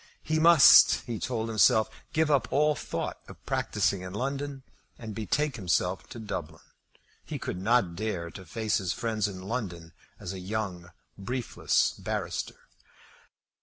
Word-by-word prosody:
He 155 Hz, 0 st, 0 dB
must, 165 Hz, -3 st, +8 dB
he 115 Hz, -3 st, -4 dB
told 115 Hz, -3 st, -2 dB
himself, 110 Hz, 0 st, +4 dB, 0.2 s
give 155 Hz, -1 st, +1 dB
up 130 Hz, -5 st, +2 dB
all 150 Hz, +2 st, +3 dB
thought -, -, -4 dB
of -, -, -14 dB
practising 100 Hz, -2 st, 0 dB
in 90 Hz, +1 st, -7 dB
London 140 Hz, +2 st, -3 dB, 0.3 s
and 110 Hz, -2 st, -7 dB
betake 130 Hz, +7 st, -1 dB
himself 90 Hz, -1 st, -1 dB
to 120 Hz, -, -9 dB
Dublin. 85 Hz, -8 st, -6 dB, 0.6 s
He -, -, -5 dB
could 90 Hz, -, -5 dB
not 105 Hz, -5 st, +2 dB
dare 90 Hz, -4 st, -3 dB
to 95 Hz, -, -10 dB
face 110 Hz, +6 st, -1 dB
his 90 Hz, -3 st, -2 dB
friends 110 Hz, -3 st, -1 dB
in 95 Hz, -2 st, -8 dB
London 95 Hz, -7 st, -5 dB, 0.3 s
as 90 Hz, -, -6 dB
a 95 Hz, -, -6 dB
young 90 Hz, -3 st, -4 dB, 0.3 s
briefless 120 Hz, +5 st, 0 dB
barrister. -, -, -4 dB
110 Hz, 145 wpm, -28 LUFS, 95-125 Hz, 0.6 s, must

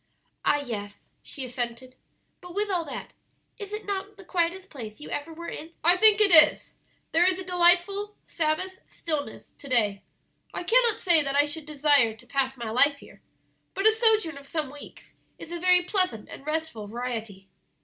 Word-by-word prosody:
"Ah, 290 Hz, -, +3 dB
yes," 205 Hz, -4 st, -8 dB
she 270 Hz, -, -7 dB
assented; 245 Hz, 0 st, -5 dB, 0.5 s
"but 360 Hz, -1 st, -12 dB
with 410 Hz, 0 st, -1 dB
all 355 Hz, -3 st, 0 dB
that, 280 Hz, -5 st, -8 dB, 0.5 s
is 405 Hz, -1 st, -7 dB
it 425 Hz, 0 st, -6 dB
not 400 Hz, 0 st, -5 dB
the 390 Hz, -, -14 dB
quietest 360 Hz, +2 st, -2 dB
place 220 Hz, -7 st, -9 dB
you 300 Hz, -, -10 dB
ever 290 Hz, +3 st, -4 dB
were 340 Hz, +1 st, -9 dB
in?" 320 Hz, +2 st, -8 dB
"I 345 Hz, +3 st, +6 dB
think 425 Hz, +2 st, +5 dB
it 415 Hz, -2 st, +5 dB
is; 315 Hz, -3 st, +6 dB, 0.4 s
there 330 Hz, +2 st, +3 dB
is 370 Hz, 0 st, +2 dB
a 375 Hz, -, -5 dB
delightful 370 Hz, +3 st, +2 dB
Sabbath 345 Hz, +4 st, -2 dB
stillness 305 Hz, -3 st, -5 dB
to 280 Hz, -, -13 dB
day. 210 Hz, -6 st, +1 dB, 0.5 s
I -, -, -4 dB
cannot 465 Hz, +3 st, +3 dB
say 345 Hz, -4 st, +5 dB
that 275 Hz, -1 st, -2 dB
I 290 Hz, +1 st, +4 dB
should 300 Hz, +1 st, -6 dB
desire 285 Hz, -6 st, +3 dB
to 250 Hz, -, -19 dB
pass 265 Hz, +1 st, -1 dB
my 230 Hz, -2 st, -5 dB
life 280 Hz, +5 st, +4 dB
here, -, -, -17 dB, 0.5 s
but 390 Hz, -, -2 dB
a 440 Hz, -, +7 dB
sojourn 435 Hz, -9 st, +2 dB
of 280 Hz, -, -16 dB
some 300 Hz, -3 st, -3 dB
weeks 290 Hz, 0 st, -13 dB, 0.2 s
is 330 Hz, -, -11 dB
a 345 Hz, -, -4 dB
very 360 Hz, 0 st, +4 dB
pleasant 365 Hz, -, +1 dB
and 275 Hz, -, -11 dB
restful 305 Hz, -9 st, -3 dB
variety." 225 Hz, -4 st, -6 dB
320 Hz, 185 wpm, -26 LUFS, 260-370 Hz, 0.5 s, a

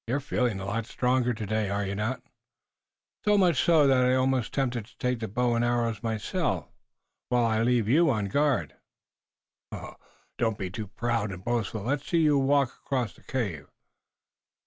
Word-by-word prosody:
You're 130 Hz, +5 st, 0 dB
feeling 125 Hz, -6 st, -1 dB
a 95 Hz, -, -5 dB
lot 110 Hz, +3 st, -2 dB
stronger 125 Hz, 0 st, +1 dB
today, 110 Hz, -2 st, -2 dB
are 100 Hz, 0 st, -1 dB
you 100 Hz, -, -3 dB
not?" 110 Hz, +6 st, -2 dB, 1.0 s
"So 210 Hz, -1 st, +4 dB
much 175 Hz, -8 st, +3 dB
so 160 Hz, -4 st, +5 dB
that 130 Hz, -2 st, +4 dB
I 125 Hz, 0 st, +3 dB
am 130 Hz, -, +3 dB
almost 130 Hz, -3 st, 0 dB
tempted 125 Hz, -5 st, -1 dB
to 120 Hz, +1 st, -22 dB
take 125 Hz, -1 st, -1 dB
the 110 Hz, -, -3 dB
bow 120 Hz, +4 st, 0 dB
and 115 Hz, 0 st, +1 dB
arrows 120 Hz, -2 st, 0 dB
myself, 110 Hz, -3 st, -2 dB, 0.6 s
while 120 Hz, -1 st, +3 dB
I 110 Hz, -1 st, +1 dB
leave 120 Hz, -2 st, +2 dB
you 160 Hz, +7 st, +4 dB
on 110 Hz, -6 st, 0 dB
guard." 130 Hz, -, +1 dB, 1.7 s
"Don't 110 Hz, -3 st, +1 dB
be 95 Hz, -2 st, -4 dB
too 105 Hz, +2 st, -5 dB
proud 115 Hz, -1 st, -2 dB
and 95 Hz, -1 st, -9 dB
boastful. 115 Hz, -3 st, -1 dB
Let's 140 Hz, +5 st, -2 dB
see 170 Hz, -2 st, +2 dB
you 150 Hz, -3 st, +4 dB
walk 140 Hz, -1 st, +3 dB
across 125 Hz, -6 st, -1 dB
the -, -, -21 dB
cave." 100 Hz, -, -3 dB
120 Hz, 175 wpm, -27 LUFS, 110-130 Hz, 1.7 s, so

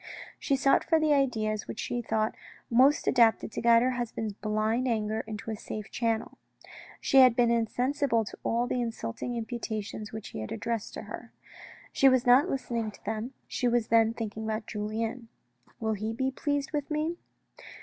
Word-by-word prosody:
She 275 Hz, -, +1 dB
sought 275 Hz, +1 st, +3 dB
for 325 Hz, -1 st, +3 dB
the 310 Hz, -1 st, +3 dB
ideas 220 Hz, -6 st, 0 dB
which -, -, -6 dB
she 245 Hz, -, -2 dB
thought 220 Hz, -1 st, 0 dB, 0.4 s
most 265 Hz, +5 st, +5 dB
adapted 230 Hz, -3 st, +4 dB
to -, -, -4 dB
guide 235 Hz, 0 st, +5 dB
her 255 Hz, -, +2 dB
husband's 230 Hz, -3 st, -3 dB
blind 215 Hz, +4 st, 0 dB
anger 220 Hz, -2 st, 0 dB
into 220 Hz, 0 st, -5 dB
a -, -, -2 dB
safe 210 Hz, 0 st, -7 dB
channel. 230 Hz, -2 st, -2 dB, 0.6 s
She 270 Hz, -, +2 dB
had 255 Hz, -3 st, +8 dB
been 240 Hz, -1 st, +3 dB
insensible 240 Hz, +1 st, +1 dB
to -, -, -9 dB
all 235 Hz, +1 st, +1 dB
the 245 Hz, 0 st, -1 dB
insulting 230 Hz, -, -4 dB
imputations 220 Hz, -2 st, -4 dB
which 220 Hz, -1 st, -7 dB
he -, -, -7 dB
had 110 Hz, -, -6 dB
addressed 225 Hz, -, -3 dB
to -, -, -6 dB
her. -, -, -9 dB, 0.6 s
She 270 Hz, -, +6 dB
was 260 Hz, -1 st, +2 dB
not 250 Hz, +3 st, +6 dB
listening 235 Hz, -4 st, -2 dB
to 205 Hz, -, -15 dB
them, 220 Hz, +4 st, -3 dB
she 250 Hz, -, -1 dB
was 240 Hz, -2 st, +1 dB
then 225 Hz, 0 st, +4 dB
thinking 220 Hz, -1 st, -5 dB
about 220 Hz, 0 st, -2 dB
Julien. 225 Hz, +3 st, -4 dB, 0.2 s
" 120 Hz, 0 st, -33 dB
Will 220 Hz, -1 st, 0 dB
he 215 Hz, +2 st, -3 dB
be 265 Hz, +3 st, -1 dB
pleased 285 Hz, +1 st, -2 dB
with 290 Hz, -2 st, -2 dB
me?" 315 Hz, +3 st, -1 dB
230 Hz, 180 wpm, -29 LUFS, 220-255 Hz, 0.6 s, had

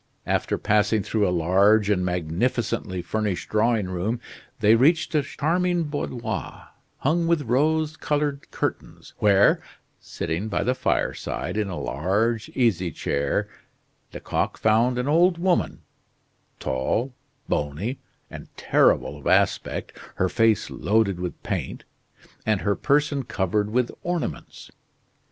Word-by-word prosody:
After -, -, 0 dB
passing 105 Hz, 0 st, +2 dB
through 105 Hz, 0 st, +1 dB
a -, -, +1 dB
large 95 Hz, +5 st, +3 dB
and 100 Hz, -3 st, +1 dB
magnificently 90 Hz, +2 st, -1 dB
furnished 105 Hz, +1 st, -2 dB
drawing 110 Hz, -1 st, +2 dB
room, 95 Hz, +6 st, -2 dB, 0.4 s
they 110 Hz, 0 st, +5 dB
reached 150 Hz, +10 st, +3 dB
a 150 Hz, -, +3 dB
charming 175 Hz, +5 st, 0 dB
boudoir, 145 Hz, -5 st, -5 dB, 0.3 s
hung 165 Hz, +4 st, +1 dB
with 165 Hz, -3 st, +2 dB
rose 155 Hz, +5 st, +1 dB
colored 145 Hz, -1 st, -2 dB
curtains, -, -, -5 dB
where, 100 Hz, -1 st, +4 dB, 0.4 s
sitting 85 Hz, +6 st, -4 dB
by 100 Hz, -1 st, -1 dB
the 125 Hz, +5 st, +1 dB
fireside, 130 Hz, -, -2 dB
in 105 Hz, -1 st, 0 dB
a 90 Hz, -, -4 dB
large 105 Hz, +10 st, -1 dB
easy 100 Hz, -9 st, +2 dB
chair, 70 Hz, -2 st, -1 dB, 0.6 s
Lecoq -, -, -2 dB
found 115 Hz, +3 st, +2 dB
an 125 Hz, +2 st, -1 dB
old 170 Hz, +4 st, +4 dB
woman, 180 Hz, 0 st, 0 dB, 0.8 s
tall, 65 Hz, -, -1 dB, 0.3 s
bony, 75 Hz, -, -2 dB, 0.3 s
and -, -, -9 dB
terrible -, -, +2 dB
of -, -, -7 dB
aspect, -, -, +1 dB, 0.2 s
her 95 Hz, -, +1 dB
face 110 Hz, -1 st, +2 dB
loaded 105 Hz, -4 st, +1 dB
with 90 Hz, -1 st, -5 dB
paint, -, -, -4 dB, 0.6 s
and 110 Hz, -3 st, +1 dB
her 100 Hz, -1 st, +1 dB
person 145 Hz, 0 st, +1 dB
covered 105 Hz, -2 st, -1 dB
with 120 Hz, +2 st, 0 dB
ornaments. 170 Hz, -, -4 dB
110 Hz, 125 wpm, -24 LUFS, 95-140 Hz, 0.8 s, they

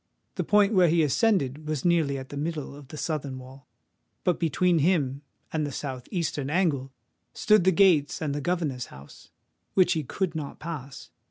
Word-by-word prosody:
The -, -, -2 dB
point 210 Hz, 0 st, +4 dB
where 185 Hz, -3 st, +5 dB
he 165 Hz, 0 st, +3 dB
ascended 150 Hz, -, +1 dB
was 155 Hz, -1 st, -2 dB
nearly 160 Hz, -5 st, +2 dB
at 130 Hz, 0 st, -8 dB
the -, -, -7 dB
middle 150 Hz, -1 st, -4 dB
of 145 Hz, -2 st, -12 dB
the 155 Hz, -, -9 dB
southern 145 Hz, -4 st, -3 dB
wall; 130 Hz, +1 st, -13 dB, 0.6 s
but 180 Hz, -, +1 dB
between 170 Hz, +1 st, +2 dB
him 145 Hz, -5 st, +1 dB, 0.3 s
and 155 Hz, -1 st, 0 dB
the 145 Hz, -, -3 dB
south 130 Hz, -2 st, -5 dB
eastern 155 Hz, -6 st, -2 dB
angle 150 Hz, -6 st, 0 dB, 0.4 s
stood 215 Hz, -4 st, +4 dB
the 190 Hz, -, +6 dB
gates 170 Hz, -6 st, +4 dB
and 150 Hz, -3 st, -2 dB
the 145 Hz, -, -3 dB
governor's 150 Hz, -7 st, -2 dB
house, 70 Hz, +1 st, -14 dB, 0.5 s
which 185 Hz, -1 st, +5 dB
he 160 Hz, -3 st, -1 dB
could 185 Hz, +6 st, -2 dB
not 150 Hz, -4 st, -5 dB
pass. 145 Hz, -5 st, -8 dB
155 Hz, 180 wpm, -27 LUFS, 140-175 Hz, 0.6 s, the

